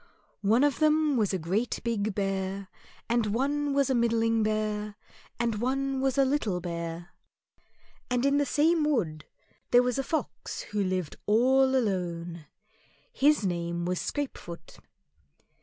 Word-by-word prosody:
One 220 +6 +3
of 290 -2 +2
them 310 -1 +3
was 215 -5 +1
a 190 - 0
great 190 +8 -1
big 215 -3 -1
Bear, 195 -1 -2 0.4
and 235 -2 +1
one 280 +6 0
was 275 -1 +2
a - - +3
middling 230 -1 +2
Bear, 215 -1 -1 0.4
and 230 -3 -1
one 270 +1 0
was 270 -1 0
a 275 - +5
little 245 -10 0
Bear. 170 -1 -5 1.0
And 250 +1 +1
in 280 +1 +3
the 290 - +2
same 315 +4 +3
wood 175 - 0 0.4
there 245 0 +6
was 250 +2 0
a - - 0
Fox 315 +3 -3
who 205 -1 -2
lived 185 -4 -2
all 260 +5 +4
alone, 175 - -2 0.7
his 290 - +3
name 170 -1 -2
was 180 0 -1
Scrapefoot. 260 -12 -6
225 Hz, 140 wpm, -28 LUFS, 190-270 Hz, 1.0 s, there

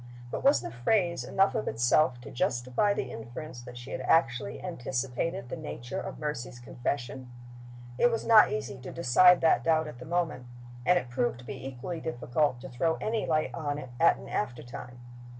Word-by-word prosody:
But - - -4
was 280 +2 +5
the - - -6
phrase 170 - +1
enough 195 +1 +2
of 105 - -2
itself 120 +3 +3
to 140 - -10
justify 125 - +1
the 130 -10 -2
inference 120 +4 -8
that 120 0 -10
she 120 +2 -9
had - - -3
actually 120 -10 +2
anticipated 130 -3 -3
the - - -3
nature 135 -7 -5
of - - -6
Mercy's 150 -5 -4
confession? 125 +1 -4 0.7
It 240 - +6
was 230 -1 -2
not 225 -2 +7
easy 120 +5 -4
to 125 - -8
decide 175 +4 +5
that 165 - +4
doubt 160 -1 +2
at 150 -5 -9
the 125 - -9
moment 165 -7 -1 0.4
and 180 - +6
it 125 -8 -3
proved 120 0 0
to - - -14
be 130 0 -6
equally 135 +6 -5
difficult 145 -2 0
to 135 - -8
throw 160 +6 0
any 220 0 -2
light 155 -1 +1
on 145 -3 -2
it 130 -4 -8
at - - +5
an - - -11
aftertime. 120 +2 -5
135 Hz, 185 wpm, -29 LUFS, 120-165 Hz, 0.7 s, not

